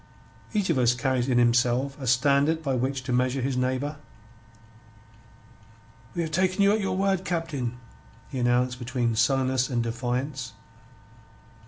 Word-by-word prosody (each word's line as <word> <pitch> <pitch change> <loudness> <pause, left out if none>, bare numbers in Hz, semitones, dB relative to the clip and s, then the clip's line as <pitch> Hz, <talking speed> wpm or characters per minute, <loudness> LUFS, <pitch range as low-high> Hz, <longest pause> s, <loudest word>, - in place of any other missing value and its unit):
Each 205 -5 0
of 140 - +1
us 120 -1 +3
carries 130 0 0
in 125 - +2
himself 125 +3 +2
a 130 - -4
standard 140 +6 +3
by 135 -3 0
which 130 +1 -1
to 125 - -3
measure 125 +2 +1
his 135 0 -1
neighbour. 130 +3 -1 2.2
"We 170 - 0
have 160 - -4
take' 185 +3 +1
you 200 0 +4
at 215 - 0
your 195 -1 -1
word, 195 -1 +1
Captain," 155 -9 -3 0.5
he 135 - -5
announced, 125 +1 +1
between 120 -2 -1
sullenness 130 +2 +2
and 120 -3 0
defiance. 125 +3 -3
130 Hz, 145 wpm, -26 LUFS, 125-150 Hz, 2.2 s, you